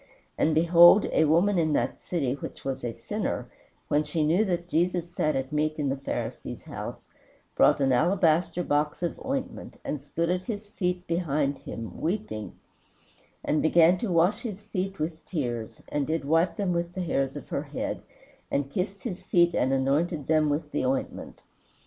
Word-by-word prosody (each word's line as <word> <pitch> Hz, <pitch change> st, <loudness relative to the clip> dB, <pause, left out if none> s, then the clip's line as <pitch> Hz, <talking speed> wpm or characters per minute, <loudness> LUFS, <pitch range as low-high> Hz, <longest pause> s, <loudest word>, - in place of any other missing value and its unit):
And 155 Hz, 0 st, +2 dB
behold 170 Hz, +4 st, +7 dB
a 160 Hz, -, +4 dB
woman 175 Hz, +5 st, +3 dB
in 155 Hz, -2 st, +1 dB
that -, -, 0 dB
city 140 Hz, -8 st, -1 dB
which 140 Hz, -, -8 dB
was 135 Hz, -1 st, -3 dB
a 120 Hz, -, -1 dB
sinner, -, -, -4 dB, 0.4 s
when 145 Hz, -, +2 dB
she 155 Hz, +1 st, -1 dB
knew 170 Hz, +7 st, +3 dB
that 175 Hz, -3 st, -2 dB
Jesus 175 Hz, 0 st, 0 dB
sat 155 Hz, -3 st, +1 dB
at 135 Hz, 0 st, -2 dB
meat 155 Hz, +1 st, 0 dB
in 145 Hz, -3 st, 0 dB
the 135 Hz, -, 0 dB
Pharisee's 135 Hz, 0 st, -5 dB
house, -, -, -7 dB, 0.5 s
brought -, -, +5 dB
an 135 Hz, -1 st, +2 dB
alabaster 170 Hz, +4 st, +2 dB
box 150 Hz, +2 st, 0 dB
of 175 Hz, -, -3 dB
ointment, 270 Hz, 0 st, -4 dB
and 145 Hz, -, -3 dB
stood 165 Hz, +4 st, -1 dB
at 180 Hz, 0 st, 0 dB
his 205 Hz, -1 st, -5 dB
feet 180 Hz, -3 st, -2 dB
behind 150 Hz, -5 st, 0 dB
him, 110 Hz, -5 st, -7 dB
weeping, 165 Hz, -, -3 dB, 0.9 s
and 155 Hz, -, +2 dB
began 170 Hz, +2 st, +5 dB
to 215 Hz, -2 st, -2 dB
wash 180 Hz, +7 st, +3 dB
his 210 Hz, -4 st, -6 dB
feet 195 Hz, -2 st, -3 dB
with 155 Hz, +1 st, -4 dB
tears, 120 Hz, -, -4 dB
and 145 Hz, -2 st, -1 dB
did 160 Hz, -2 st, -1 dB
wipe 165 Hz, +4 st, +2 dB
them 195 Hz, -3 st, 0 dB
with 170 Hz, 0 st, -2 dB
the 185 Hz, -, -2 dB
hairs 135 Hz, -5 st, -1 dB
of -, -, -8 dB
her -, -, -1 dB
head, -, -, -4 dB, 0.5 s
and 140 Hz, 0 st, -1 dB
kissed 190 Hz, +5 st, -3 dB
his 185 Hz, -6 st, -4 dB
feet 175 Hz, -2 st, +3 dB
and 130 Hz, -, +1 dB
anointed 140 Hz, +4 st, +1 dB
them 155 Hz, 0 st, +3 dB
with 150 Hz, +1 st, -2 dB
the -, -, -1 dB
ointment. 130 Hz, +1 st, -3 dB
165 Hz, 180 wpm, -27 LUFS, 145-180 Hz, 0.9 s, behold